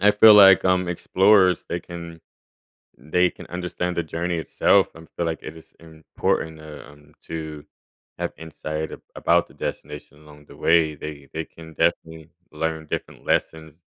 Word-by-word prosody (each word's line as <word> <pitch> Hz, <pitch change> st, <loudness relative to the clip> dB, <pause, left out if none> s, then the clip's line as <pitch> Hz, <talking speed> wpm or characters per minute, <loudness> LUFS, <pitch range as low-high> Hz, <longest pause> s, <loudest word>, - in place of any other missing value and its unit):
I 105 Hz, +2 st, +6 dB
feel 105 Hz, +1 st, +8 dB
like, 95 Hz, -2 st, +8 dB
um, 90 Hz, -1 st, +2 dB
explorers, 95 Hz, +1 st, +3 dB
they 85 Hz, -, -3 dB
can 85 Hz, -1 st, -9 dB, 0.8 s
they 90 Hz, +7 st, +1 dB
can -, -, -13 dB
understand 90 Hz, 0 st, -3 dB
the 85 Hz, -, +1 dB
journey 85 Hz, +2 st, -3 dB
itself. 80 Hz, -, +3 dB
I 80 Hz, -, -12 dB, 0.2 s
feel 85 Hz, -, -1 dB
like 80 Hz, -1 st, -3 dB
it 75 Hz, -, -8 dB
is 80 Hz, -, -16 dB
important 80 Hz, 0 st, -3 dB
to, 75 Hz, -1 st, -11 dB
um, 75 Hz, +1 st, -18 dB
to 80 Hz, -2 st, -6 dB, 0.6 s
have -, -, -3 dB
insight 80 Hz, -1 st, -5 dB
a -, -, -9 dB
about -, -, +2 dB
the -, -, -20 dB
destination 75 Hz, -, -7 dB
along 75 Hz, -1 st, -17 dB
the -, -, -15 dB
way. 80 Hz, -2 st, +3 dB
They 75 Hz, -2 st, -9 dB
they 80 Hz, 0 st, -4 dB
can 80 Hz, 0 st, -14 dB
definitely 80 Hz, +1 st, -1 dB, 0.2 s
learn 80 Hz, 0 st, -3 dB
different -, -, -6 dB
lessons. 80 Hz, +1 st, -2 dB
80 Hz, 165 wpm, -23 LUFS, 80-90 Hz, 0.8 s, feel